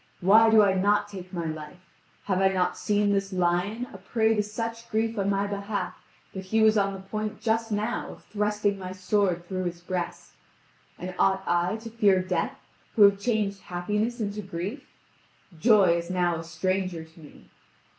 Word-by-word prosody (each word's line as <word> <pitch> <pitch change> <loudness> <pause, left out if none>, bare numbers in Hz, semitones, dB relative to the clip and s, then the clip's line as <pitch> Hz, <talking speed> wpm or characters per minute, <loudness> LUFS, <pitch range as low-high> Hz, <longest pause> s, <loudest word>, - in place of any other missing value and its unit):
Why 215 +5 +6
do 220 -1 +7
I 195 -2 +3
not 205 +2 +2
take 185 -3 -9
my 170 -3 -3
life? 155 +3 -7 0.4
Have 190 -2 0
I 195 - +5
not 180 -2 +1
seen 205 -1 +1
this 195 0 -1
lion 185 +6 0
a - - -10
prey 225 -1 +1
to 210 - +2
such 230 +2 -5
grief 225 +1 0
on 200 0 +1
my 200 0 +1
behalf 200 -1 -3 0.4
that 190 -1 -6
he 220 +3 +2
was 220 0 +5
on 195 -1 +2
the 190 - -8
point 215 +2 -4
just 225 0 0
now 215 +3 -2
of - - -12
thrusting 210 -1 -1
my 185 0 -6
sword 185 -2 0
through 185 -1 -3
his 175 -1 -4
breast? 180 0 -4 0.7
And 180 +1 -6
ought 190 0 +3
I 175 +3 +1
to 225 +1 -8
fear 205 -4 +4
death 180 -2 -2 0.4
who 215 - +7
have 200 -1 +6
changed 205 -3 -1
happiness 210 +7 -2
into 210 -1 -3
grief? 195 - -6 0.7
Joy 200 -5 +5
is 170 0 -5
now 175 -2 +1
a 165 - -6
stranger 180 +1 -2
to 160 +1 -18
me. 145 - -16
195 Hz, 185 wpm, -27 LUFS, 180-215 Hz, 0.7 s, do